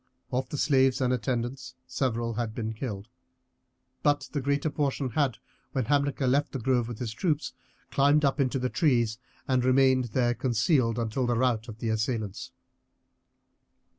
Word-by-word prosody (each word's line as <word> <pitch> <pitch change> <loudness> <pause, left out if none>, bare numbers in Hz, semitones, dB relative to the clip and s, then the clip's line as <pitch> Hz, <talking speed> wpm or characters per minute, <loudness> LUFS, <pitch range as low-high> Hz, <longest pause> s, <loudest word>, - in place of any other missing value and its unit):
Of 125 0 -1
the 145 - -4
slaves 135 -3 +3
and 125 -1 +2
attendants 125 +2 -3
several 120 -3 -1
had 115 -1 -3
been 110 -1 -3
killed, 105 -3 -5 0.9
but 145 -1 +1
the 145 - -2
greater 140 +3 0
portion 140 -3 -1
had, 140 -1 +1 0.4
when 130 -4 0
Hamilcar 140 +1 +1
left 140 +3 +1
the 135 - -2
grove 120 -1 +1
with 120 -2 -6
the 125 - -4
troops, 145 - -1 0.4
climbed 145 +2 +4
up 140 +2 +1
into 130 -1 +1
trees, 120 -7 +1 0.3
and 130 -2 +2
remained 130 0 +4
there 120 +1 +1
concealed 120 - +1
until 120 +2 -1
the 120 - +1
rout 120 -2 +1
of 110 -2 -8
the 115 0 -3
assailants. 110 -2 -2
125 Hz, 155 wpm, -28 LUFS, 115-135 Hz, 0.9 s, climbed